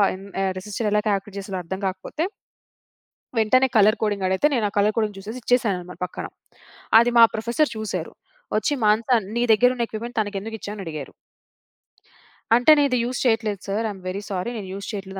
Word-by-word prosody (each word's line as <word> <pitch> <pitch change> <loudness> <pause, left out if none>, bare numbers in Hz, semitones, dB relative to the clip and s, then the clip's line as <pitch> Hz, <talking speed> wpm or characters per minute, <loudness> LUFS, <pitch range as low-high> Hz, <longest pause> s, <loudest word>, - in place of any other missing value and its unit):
ఎన్ 195 +1 -11 0.2
ఆహ్, 190 - +1
రిజిస్టర్ 210 +2 -3
ఎలా 210 - +3
కాలిక్యులేట్ 200 0 -2
చేస్తారో 190 -2 -5
అర్థం 190 +3 -4
కాకపోతే... 190 - -3 1.1
వెంటనే 255 +4 +4
కలర్ 215 +1 +5
కోడింగ్ 205 -3 0
అడిగితే, 190 +10 +3
నేను 235 -5 +1
ఆ - - -15
కలర్ 210 +1 +3
కోడింగ్ 215 -3 0
జూసేసి 215 +6 -7
ఇచ్చేసానన్నమాట 195 -8 0
పక్కన. 180 - -7 0.7
అది 240 +1 +3
మా 230 - +10
ప్రొఫెసర్ 235 +7 0
చూసారు. 220 -1 -4 0.4
ఒచ్చి 215 +7 0
"మానస 220 +4 +2 0.3
నీ 235 - +1
దగ్గరున్న 245 +2 +3
ఎక్విప్మెంట్ 235 +2 -7
తనకెందుకిచ్చావు?" 210 0 -4
అని 195 - -6
అడిగారు. 150 -4 -6 1.4
అంటే 245 +6 +5
నేనిది 280 -4 +3
యూజ్ 245 +1 -3
చెయ్యట్లేదు 220 -4 +1
sir. 210 +3 -1
I - - -3
M 190 - -13
very 190 +2 -3
sorry 190 +3 -2
నేను 200 -3 -6
యూజ్ 200 0 -7
చెయ్యట్లేదు 195 -2 -6
210 Hz, 170 wpm, -23 LUFS, 195-235 Hz, 1.4 s, మా